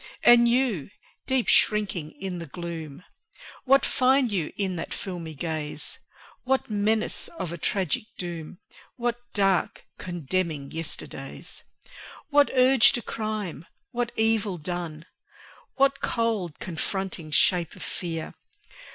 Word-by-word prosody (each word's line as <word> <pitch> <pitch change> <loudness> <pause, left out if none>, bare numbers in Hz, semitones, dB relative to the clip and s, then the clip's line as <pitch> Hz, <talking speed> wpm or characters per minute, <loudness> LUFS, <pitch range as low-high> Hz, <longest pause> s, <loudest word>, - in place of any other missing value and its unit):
And 240 0 +8
You, 235 - +1 0.4
deep 260 -3 +1
shrinking 195 -7 +3
in 185 -2 -4
the 165 - -7
gloom, 165 -1 -6 0.6
What 275 +1 +5
find 260 -2 +3
you 175 -7 -1
in 190 -3 -1
that 165 - -4
filmy 170 -5 -6
gaze? 155 0 -3 0.4
What 260 -3 0
menace 215 +1 +1
of 180 - -5
a - - -5
tragic 190 +2 0
doom? 170 -2 -6 0.4
What 240 -1 -1 0.2
dark, 195 -3 +1
condemning 170 -4 -2
yesterdays? 150 -4 -4 0.7
What 290 0 +6
urge 255 -1 +7
to 240 -3 0
crime, 210 -8 -4 0.2
what 240 -1 -1
evil 220 -4 +2
done? 165 -1 -5 0.7
What 275 0 +3
cold, 220 -9 0
confronting 185 -1 -4
shape 170 +2 +3
of - - -8
fear? 165 -3 -4
190 Hz, 115 wpm, -26 LUFS, 165-230 Hz, 0.7 s, And